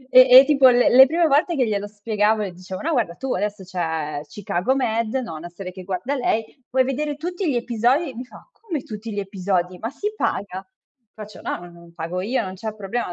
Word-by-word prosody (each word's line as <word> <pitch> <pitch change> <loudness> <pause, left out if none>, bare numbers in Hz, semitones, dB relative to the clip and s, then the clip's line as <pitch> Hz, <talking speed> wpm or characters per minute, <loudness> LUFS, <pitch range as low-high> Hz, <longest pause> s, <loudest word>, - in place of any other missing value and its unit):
E 255 0 +10
e 270 - +6
tipo 275 -3 +5
le 245 0 +4
le 265 +2 +9
prime 330 +2 +2
volte 310 +4 +2
che 255 -3 +2
glielo 205 -1 -2
spiegavo 210 +1 0
e 195 - -4
dicevo: 185 +1 -8
"No 330 - -1
guarda 230 - 0
tu 265 +4 -3
adesso 205 0 -3
c'è 160 -5 -3
Chicago 190 - -1
Med", 230 -4 0
no, 240 -10 -3
una 170 +3 -8
serie 180 +1 -8
che 185 0 -10
guarda 195 +10 -3
lei 245 +1 -2
"puoi 260 0 +3
vedere 290 +3 -2
tutti 350 +2 -3
gli 255 - 0
episodi", 240 +6 +1
e - - -17
mi 250 - -6
fa - - -16
"come 335 - -4
tutti 215 +1 -7
gli 205 - -2
episodi? 185 -2 -2
Ma 225 - -3
si 415 +10 -4
paga?", 190 - -3 0.5
faccio 215 -1 -10
"no, - - -3
non, 170 0 -16
pago 170 +2 -4
io, 235 +7 0
non 185 - -6
c'è 215 +3 -5
problema, 215 +3 -3
220 Hz, 220 wpm, -22 LUFS, 185-265 Hz, 0.5 s, E